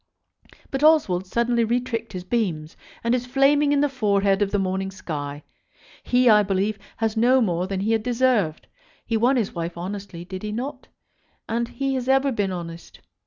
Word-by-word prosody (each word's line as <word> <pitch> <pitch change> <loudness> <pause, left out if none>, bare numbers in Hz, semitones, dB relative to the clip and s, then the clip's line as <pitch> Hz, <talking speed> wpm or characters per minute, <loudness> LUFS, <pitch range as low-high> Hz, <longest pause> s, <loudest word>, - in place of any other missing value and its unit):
But 270 +1 -2
Oswald 210 - +4
suddenly 235 +3 +1
retricked 235 -1 -2
his 180 -1 -5
beams, 180 -8 -2 0.3
and 235 +1 +1
is 250 0 -1
flaming 285 +3 +3
in 285 -1 +3
the 290 - +3
forehead 200 -6 +1
of 205 - +2
the 205 - 0
morning 190 0 -1
sky. 145 -6 -6 0.6
He, 250 0 +2
I 210 -2 +7
believe, 200 +1 -1 0.2
has 225 -1 -1
no 245 +4 +4
more 180 -6 0
than 190 -1 -3
he 215 +3 0
has 225 -1 +2
deserved. 235 -8 +1 0.4
He 230 - -1
won 240 +5 +3
his 230 -6 -1
wife 170 0 -4
honestly; 185 -1 -6
did 185 +1 -7
he 210 - -4
not? 260 +5 -5 0.6
And 235 +1 -1
he 275 +2 -2
has 255 -1 -2
ever 270 +1 +3
been 205 -5 -1
honest. 170 -2 -8
215 Hz, 180 wpm, -23 LUFS, 190-250 Hz, 0.6 s, I